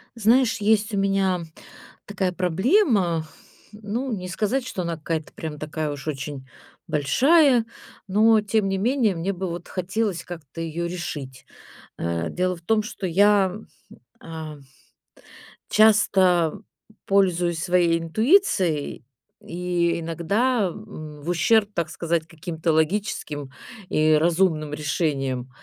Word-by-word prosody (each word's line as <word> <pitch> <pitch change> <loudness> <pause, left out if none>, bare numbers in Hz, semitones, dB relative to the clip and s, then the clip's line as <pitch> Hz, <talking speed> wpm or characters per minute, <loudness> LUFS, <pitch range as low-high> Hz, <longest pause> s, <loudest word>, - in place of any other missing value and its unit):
Знаешь, 235 +2 +3
есть 210 +1 +2
у 200 - 0
меня 195 -2 +1 0.6
такая 190 -2 -1
проблема, 185 - +2 0.5
ну, 220 +5 -4
не 185 -2 -6
сказать, 225 +7 -1
что 195 - -4
она 170 -1 -2
какая-то 160 0 -4
прям 155 -2 -6
такая 155 0 -3
уж 145 +1 -8
очень 140 -2 -5 0.4
большая, 260 - +4 0.4
но 215 +3 +4
тем 210 -1 0
не 195 - 0
менее 225 -1 +1
мне 175 +4 -2
бы 190 +1 -4
вот 170 +1 -6
хотелось 190 -1 -2
как-то 165 -2 -9
ее 165 +1 -3
решить, 150 -7 -6 0.5
э. 85 0 -2
Дело 180 0 -1
в 170 - -17
том, 215 +5 +1
что 210 -2 -5
я, 195 +1 +3 0.7
а 160 -2 -8 1.1
часто 190 -6 +4 0.4
пользуюсь 175 -4 +1
своей 175 -2 +2
интуицией 180 - +1 0.4
и 170 -1 -1
иногда, 200 +8 0
м, 160 -7 -9
в 155 - -6
ущерб, 205 +4 +3
так 170 -4 -2
сказать, 170 -1 -2
каким-то 165 0 -3
логическим 155 -4 -1 0.4
и 155 0 +3
разумным 160 -1 +2
решениям, 140 -4 -2
180 Hz, 120 wpm, -24 LUFS, 160-205 Hz, 1.1 s, большая